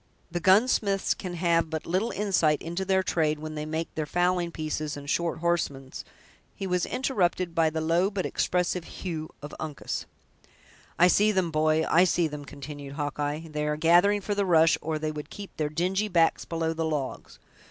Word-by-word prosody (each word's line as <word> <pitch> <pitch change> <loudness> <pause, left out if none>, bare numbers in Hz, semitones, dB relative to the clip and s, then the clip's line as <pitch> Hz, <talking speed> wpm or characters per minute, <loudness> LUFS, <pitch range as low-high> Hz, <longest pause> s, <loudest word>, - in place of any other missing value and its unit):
The 175 - -1
gunsmiths 200 +1 +3
can 180 -2 -6
have 170 -1 +2
but 160 -1 -4
little 185 +7 0
insight 180 -7 +2
into 170 +3 -3
their 190 0 +2
trade 155 -4 +1
when 155 +1 -6
they 150 0 -4
make 160 +1 -3
their 155 -1 -3
fowling 175 +1 +1
pieces 155 -2 -3
and 140 0 -9
short 165 +1 -1
horsemen's—" 145 -6 -2 0.5
He 195 - -5
was 180 -2 0
interrupted 185 -9 0
by 165 -1 +3
the 160 0 -3
low 170 +4 +2
but 200 -3 -3
expressive 180 0 0
"hugh" 160 -2 -6
of 145 - -7
Uncas. 155 -2 -4 0.9
"I 175 - +6
see 210 +4 +4
them, 185 -4 0
boy, 155 0 +2
I 175 +3 +5
see 175 -2 +2
them!" 150 -1 -7
continued 140 0 -8
Hawkeye; 145 +2 -3
"they 150 0 -2
are 150 0 0
gathering 175 +6 +4
for 205 - -2
the 205 0 +1
rush, 165 -3 +5
or 155 0 -2
they 155 0 -2
would 150 0 -7
keep 200 -1 -9
their 150 -1 0
dingy 185 +7 0
backs 170 -4 +2
below 165 -1 -1
the 165 0 -2
logs. 150 -4 -4
165 Hz, 185 wpm, -27 LUFS, 155-180 Hz, 0.9 s, I